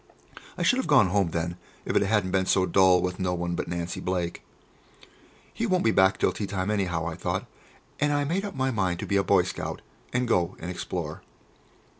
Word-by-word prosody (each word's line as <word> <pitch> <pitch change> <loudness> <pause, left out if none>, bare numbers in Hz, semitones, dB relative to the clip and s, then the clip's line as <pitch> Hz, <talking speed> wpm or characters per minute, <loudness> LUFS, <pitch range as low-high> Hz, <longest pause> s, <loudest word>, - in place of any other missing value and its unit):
I - - -1
should 250 - +4
have 260 - -1
gone 130 - +5
home 95 -2 +2
then, 85 +1 -3 0.3
if - - -2
it - - +5
hadn't 100 -2 +1
been 95 0 +1
so 95 -1 +3
dull 95 -2 +4
with 90 +1 -3
no 90 -1 0
one 85 0 -2
but - - -3
Nancy 85 0 -3
Blake. 90 -2 -2 1.1
"He 230 - -2
won't 185 -3 +2
be 115 - +4
back 95 -1 +4
until - - +1
tea 105 - -4
time 95 +1 -2
anyhow," 90 -6 -1
I 85 - -3
thought, - - -3 0.5
and 150 0 +2
I 145 0 +1
made 175 +7 -1
up 200 -2 -5
my 130 0 0
mind 95 -6 0
to - - -3
be 100 - +1
a 100 - +3
boy 95 -2 +4
scout, 90 - -5 0.3
and 125 0 0
go 90 -5 +1
and 85 +2 -5
explore. 90 - -5
95 Hz, 215 wpm, -26 LUFS, 90-110 Hz, 1.1 s, gone